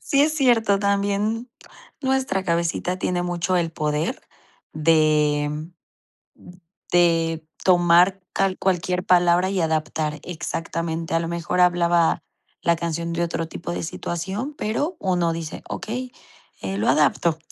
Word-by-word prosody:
Sí, 275 - +2
es 310 +1 +2
cierto, 225 -7 +3
también 205 +4 0 0.5
nuestra 260 -8 0
cabecita 170 +2 -1
tiene 180 -1 -1
mucho 175 +1 -1
el 165 -2 0
poder 150 0 -2 0.5
de, 150 -2 +3 0.9
mm, 175 - -15 0.4
de 165 -2 +2 0.2
tomar 180 +1 +4
cal 195 -1 +1
cualquier 180 0 0
palabra 180 0 +4
y 190 -3 0
adaptar 155 -1 -1
exactamente. 165 -1 -4
A 165 - +3
lo 165 - -3
mejor, 170 +2 -1
hablaba 170 -2 +3 0.4
la 170 - +3
canción 170 0 -3
de 170 +1 0
otro 165 -1 -2
tipo 170 - -6
de - - -3
situación, 190 - -4
pero 290 - -1
uno 175 -3 +1
dice: 165 -2 -6
"Okey, 250 +3 -4 0.5
eh, 95 0 -3
lo 105 - +1
adapto. 155 +3 +2
175 Hz, 130 wpm, -23 LUFS, 165-190 Hz, 0.9 s, tomar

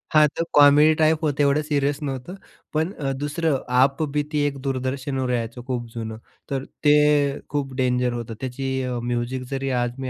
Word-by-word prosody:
हां, 150 0 +7
तर 165 - +1
comedy 145 +2 +7
type 155 0 +3
होतं 145 -1 +1
एवढं 140 +2 +3
सीरियस 145 -1 0
नव्हतं, 135 +6 -5 0.4
पण 160 +6 0
अ, 135 -2 -3
दुसरं 150 0 0 0.2
आप 140 +3 +2
बीती 150 +1 -1
एक 140 -1 -4
दूरदर्शनवर 130 0 -2
यायचं 120 +1 -3
खूप 120 -2 -2
जुनं. 110 -1 -5 0.3
तर 135 0 -2 0.2
ते 145 -1 +4
खूप 140 -2 -2
डेंजर 125 -1 +1
होतं, 115 -1 -5
त्याची 130 +1 -3
अ, 125 -1 -2
म्युझिक 120 +1 -2
जरी 135 0 -2
आज 120 0 -3
मी 130 -1 -3
135 Hz, 170 wpm, -23 LUFS, 125-150 Hz, 0.4 s, हां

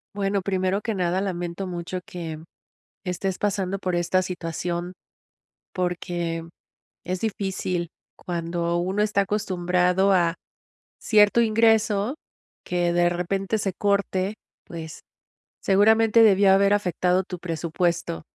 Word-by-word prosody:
Bueno, 195 -1 0
primero 190 +1 0
que 225 -3 -2
nada, 185 +1 0
lamento 175 0 -3
mucho 180 +1 -5
que 165 -3 -6 0.6
estés 185 0 -3
pasando 195 -2 -1
por 185 -2 -2
esta 175 +2 +2
situación. 175 0 -4 0.8
Porque 175 -2 -2 0.6
es 185 0 -3
difícil 190 -5 -2 0.2
cuando 170 0 -2
uno 190 +4 0
está 210 -1 +2
acostumbrado 180 -1 +1
a, 170 -2 +2 0.6
cierto 210 +1 +4
ingreso 220 +1 +2 0.5
que 175 -1 0
de 175 0 +3
repente 195 +4 -1
se 195 -2 -1
corte, 200 0 0 0.3
pues, 160 -2 -8 0.6
seguramente 220 +3 +4
debió 195 -2 +6
haber 200 +1 +4
afectado 180 -1 +1
tu 180 -2 -7
presupuesto, 170 - -2
185 Hz, 110 wpm, -24 LUFS, 175-200 Hz, 0.8 s, debió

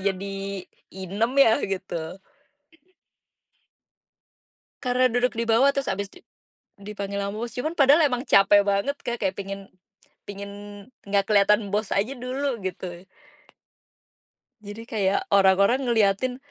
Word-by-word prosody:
jadi 195 0 -4 0.3
inem 195 +6 -2
ya 225 - +3
gitu. 185 -3 -5 2.7
Karena 250 -1 +2
duduk 245 -1 0
di 230 - -1
bawah 230 +5 +4
terus 270 -8 -1
habis 200 +1 -4
di - - -19 0.5
dipanggil 200 0 -6
sama 200 +1 -4
bos, 235 +1 -4
cuman 310 +6 -3
padahal 285 +4 +6
emang 250 0 -2
capek 200 +1 +5
banget, 200 +8 0
Kak, 240 -1 -3
kayak 190 -1 0
pengen 195 0 -7 0.6
pengen 200 0 -7 0.6
nggak 200 0 +1
kelihatan 210 0 +3
bos 210 -1 -1
aja 215 +7 0
dulu 255 +1 -3
gitu. 180 -1 -6 1.6
Jadi 210 +2 -9
kayak 200 -5 0
orang-orang 200 +5 +4
ngeliatin, 225 +3 +1
200 Hz, 120 wpm, -24 LUFS, 195-240 Hz, 2.7 s, padahal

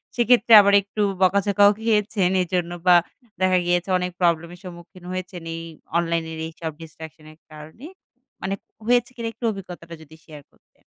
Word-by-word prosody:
সেক্ষেত্রে 240 -1 +3
আবার 200 0 +2
একটু 205 +2 -6 0.2
বকাঝকাও 200 +2 +4
খেয়েছেন 210 -4 +1
এজন্য 175 -1 -2 0.2
বা 180 - +7 0.5
দেখা 185 0 +3
গিয়েছে 175 +1 0
অনেক 180 0 -3
প্রবলেম 170 -1 +1
এর - - -19
সম্মুখীন 180 0 -12
হয়েছেন, 185 -1 -6
এই 165 - -6 0.4
অনলাইনের 165 -1 -2
এইসব 160 0 -7
distraction 160 -1 -12
এর 155 - -20
কারণে? 155 - -12 0.6
মানে 190 +1 -3 0.3
হয়েছে 245 +1 +2
কিনা 230 -2 -5
একটু 240 - -7
অভিজ্ঞতাটা 180 -4 -10
যদি 160 0 -15
শেয়ার 150 -3 -12
করতেন? - - -35
180 Hz, 155 wpm, -22 LUFS, 165-200 Hz, 0.6 s, বা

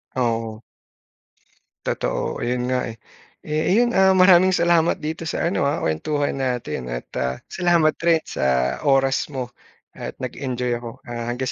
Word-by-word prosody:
Oo. 115 -3 -1 1.2
Totoo, - - -2
ayun 125 +1 -1
nga, 125 0 0
eh. 115 - -7 0.5
Eh, 155 +5 +1
yun, 240 +1 +3
ah, 190 -3 +4
maraming 185 0 +6
salamat 170 -2 +2
dito 160 +1 -4
sa - - -2
ano, 140 - +1
ah, 150 +4 -1
kuwentuhan 140 - -1
natin 125 - -2
at - - -4 0.2
ah, 65 0 -1 0.2
salamat 170 -3 +3
rin 165 -1 +3
sa 65 -1 0
oras 135 -1 +3
mo 130 -4 -5 0.4
at - - -7
nag-enjoy 125 -1 -3
ako. 120 -1 -10
Ah, 120 -1 -5
hanggang 125 +2 -2
130 Hz, 145 wpm, -22 LUFS, 120-165 Hz, 1.2 s, maraming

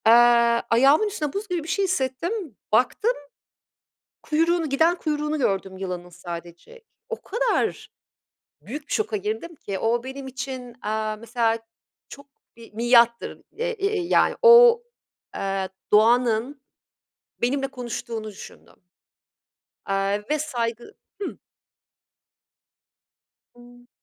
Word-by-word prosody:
Eee, - - +8 0.6
ayağımın 275 - +5
üstünde 310 -9 -3
buz 415 +2 -4
gibi 355 -4 -2
bir - - -10
şey 390 +4 +1
hissettim, 335 - -2 0.2
baktım, 255 - +2 1.1
kuyruğunu, 330 +1 +1
giden 320 +5 +3
kuyruğunu 300 -2 -2
gördüm 195 -6 -1
yılanın 180 -2 -5
sadece. 175 - -9 0.3
O 460 - -5
kadar 480 +4 -1 0.7
büyük 290 +6 -8
bir - - -4
şoka 430 -1 0
girdim 410 -4 -4
ki. 195 -9 -5
O 235 +1 +1
benim 265 +1 -7
için, 255 -1 -6
aaa, 215 0 -2
mesela 230 0 0 0.5
çok 280 - -11 0.3
bir 230 -2 -15
miattır. 235 +1 +3 0.2
E 475 - -1
e 420 -3 -1
yani 345 - +2
o, 475 0 +8 0.5
eee, 195 -1 -2 0.2
doğanın 235 +4 +3 0.8
benimle 270 +3 0
konuştuğunu 235 -3 -6
düşündüm 200 - -14 1.0
Aaa, 195 +1 0
ve 305 0 +1
saygı 240 - -3 0.3
Hıh. 395 - -3 2.2
Imm. 245 0 -17
260 Hz, 110 wpm, -24 LUFS, 225-340 Hz, 2.2 s, Eee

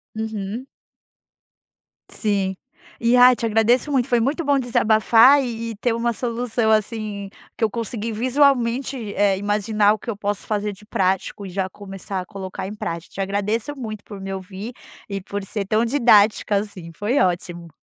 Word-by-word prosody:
Uhum. 220 +3 -4 1.4
Sim. 195 -3 -1 0.4
E, 235 +1 +3
ah, 250 0 +8
te 235 - -3
agradeço 230 +6 +2
muito, 260 -2 +2
foi 240 -3 +3
muito 285 +8 0
bom 285 -1 +3
desabafar 235 +3 +5
e 240 - -3 0.2
e - - -7
ter 230 +2 0
uma 235 +1 0
solução, 235 -1 -1
assim, 215 -2 -1 0.3
que - - -3
eu 220 - +3
consegui 230 0 -4
visualmente, 250 -1 +1
eh, 200 -1 +3
imaginar 210 +1 +2
o 215 - -5
que 235 - -8
eu 220 - -2
posso 205 -1 -3
fazer 210 -1 -2
de 210 +2 -15
prático 195 +1 -1
e - - -6
já 190 +1 -2
começar 195 -1 -6
a - - -8
colocar 190 -1 -6
em 210 - -7
prática. 170 -4 -5
Te 195 - -2
agradeço 210 +7 -1
muito 215 -6 -6
por 205 -2 -10
me 195 0 -5
ouvir 190 +5 -7 0.4
e 195 -1 -3
por 200 +1 -5
ser 200 +1 -4
tão 215 +4 +2
didática, 220 -5 +4
assim, 190 -5 -5
foi 210 - -1
ótimo. 175 -2 -1
215 Hz, 170 wpm, -22 LUFS, 195-235 Hz, 1.4 s, ah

